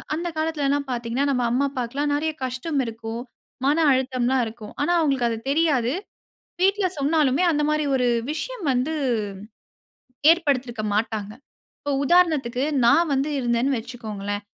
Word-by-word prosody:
அந்த 340 Hz, +2 st, -3 dB
காலத்தில 315 Hz, -2 st, -1 dB
எல்லாம் 280 Hz, 0 st, 0 dB
பார்த்தீங்கன்னா, 240 Hz, +2 st, -1 dB
நம் 250 Hz, -3 st, +1 dB
அம்மா 260 Hz, +4 st, +2 dB
அப்பாவுக்கு 250 Hz, -3 st, -5 dB
எல்லாம் 290 Hz, 0 st, +1 dB
நிறைய 315 Hz, +2 st, 0 dB
கஷ்டம் 260 Hz, +4 st, -2 dB
இருக்கும். 225 Hz, 0 st, -5 dB, 0.4 s
மன 290 Hz, +3 st, +3 dB
அழுத்தம் 260 Hz, -1 st, 0 dB
எல்லாம் 260 Hz, 0 st, +2 dB
இருக்கும். 220 Hz, -1 st, -9 dB
ஆனா 290 Hz, -, +1 dB
அவங்களுக்கு 270 Hz, -6 st, +1 dB
அது 225 Hz, -, -2 dB
தெரியாது. 280 Hz, -5 st, +2 dB, 0.7 s
வீட்ல 390 Hz, +1 st, +3 dB
சொன்னாலுமே 290 Hz, +1 st, +2 dB
அந்த 300 Hz, -1 st, +1 dB
மாதிரி 305 Hz, 0 st, +1 dB
ஒரு 250 Hz, -1 st, +2 dB, 0.2 s
விஷயம் 445 Hz, +8 st, -5 dB
வந்து, 260 Hz, +5 st, 0 dB, 1.4 s
ஏற்படுத்தியிருக்க 265 Hz, -9 st, +1 dB
மாட்டாங்க. 210 Hz, -1 st, -1 dB, 0.5 s
இப்போ 285 Hz, -, -2 dB
உதாரணத்துக்கு 280 Hz, -7 st, +3 dB, 0.2 s
நான் 310 Hz, +6 st, +4 dB
வந்து 275 Hz, +2 st, 0 dB
இருந்தேன்னு 245 Hz, +2 st, +1 dB
வச்சுக்கோங்களேன். 210 Hz, -4 st, -5 dB
265 Hz, 140 wpm, -23 LUFS, 240-305 Hz, 1.4 s, நான்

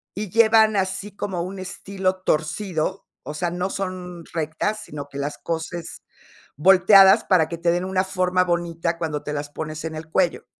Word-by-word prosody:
y 205 Hz, +1 st, -4 dB
llevan 220 Hz, 0 st, +5 dB
así 195 Hz, +1 st, -2 dB
como 190 Hz, -4 st, -3 dB
un 185 Hz, +2 st, -6 dB
estilo 190 Hz, 0 st, -3 dB
torcido, 160 Hz, +2 st, -1 dB, 0.2 s
o 150 Hz, -, -6 dB
sea, 170 Hz, +3 st, -2 dB
no 180 Hz, +2 st, -2 dB
son 180 Hz, -3 st, -5 dB
rectas, 165 Hz, +7 st, -2 dB
sino 145 Hz, -1 st, -8 dB
que 140 Hz, -, -9 dB
las 145 Hz, +1 st, -3 dB
coses 165 Hz, 0 st, -5 dB, 0.5 s
volteadas 190 Hz, +4 st, +7 dB
para 170 Hz, -4 st, +3 dB
que 170 Hz, -, -5 dB
te 170 Hz, +1 st, +1 dB
den 175 Hz, +1 st, -1 dB
una 185 Hz, 0 st, 0 dB
forma 185 Hz, -1 st, +1 dB
bonita 170 Hz, -1 st, -1 dB
cuando 155 Hz, -3 st, -3 dB
te 150 Hz, -, -5 dB
las 145 Hz, 0 st, -4 dB
pones 155 Hz, +1 st, -6 dB
en 160 Hz, -1 st, -4 dB
el 160 Hz, +1 st, -8 dB
cuello. 175 Hz, -1 st, 0 dB
175 Hz, 175 wpm, -23 LUFS, 160-190 Hz, 0.5 s, volteadas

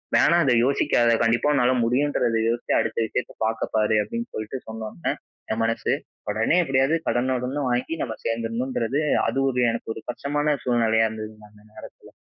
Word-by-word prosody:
வேணா 170 Hz, -, +5 dB
அதை 130 Hz, -4 st, +3 dB
யோசிக்காத! 120 Hz, -3 st, +2 dB
கண்டிப்பா 120 Hz, +5 st, +2 dB
உன்னால 125 Hz, -2 st, +3 dB
முடியுன்றத 125 Hz, -2 st, +1 dB
யோசிச்சு 120 Hz, +1 st, -1 dB
அடுத்த 115 Hz, -, -2 dB
விஷயத்தை -, -, -4 dB
பார்க்க 110 Hz, 0 st, -2 dB
பாரு." 110 Hz, 0 st, +3 dB
அப்படின்னு 235 Hz, -, -5 dB
சொல்லிட்டு 110 Hz, +5 st, -4 dB
சொன்ன 110 Hz, 0 st, -6 dB
உடனே 85 Hz, -, -2 dB, 0.4 s
என் 110 Hz, -, -2 dB
மனசு, 115 Hz, 0 st, -1 dB, 0.4 s
உடனே 110 Hz, +9 st, +1 dB
எப்படியாவது 135 Hz, +1 st, +2 dB
கடன 130 Hz, +2 st, +1 dB
உடன 130 Hz, +4 st, -3 dB
வாங்கி 125 Hz, +6 st, -1 dB
நம்ம 110 Hz, -3 st, -4 dB
சேர்ந்துடணுன்றது, 115 Hz, +3 st, -1 dB, 0.3 s
அது 135 Hz, -, 0 dB
ஒரு 125 Hz, -1 st, 0 dB
எனக்கு 115 Hz, 0 st, -5 dB
ஒரு 110 Hz, -, -9 dB
கஷ்டமான 145 Hz, +4 st, -1 dB
சூழ்நிலையா 115 Hz, -2 st, +3 dB
இருந்ததுங்க, 110 Hz, -1 st, -8 dB
அந்த 105 Hz, 0 st, -20 dB
நேரத்தில. -, -, -13 dB
120 Hz, 160 wpm, -24 LUFS, 110-135 Hz, 0.4 s, வேணா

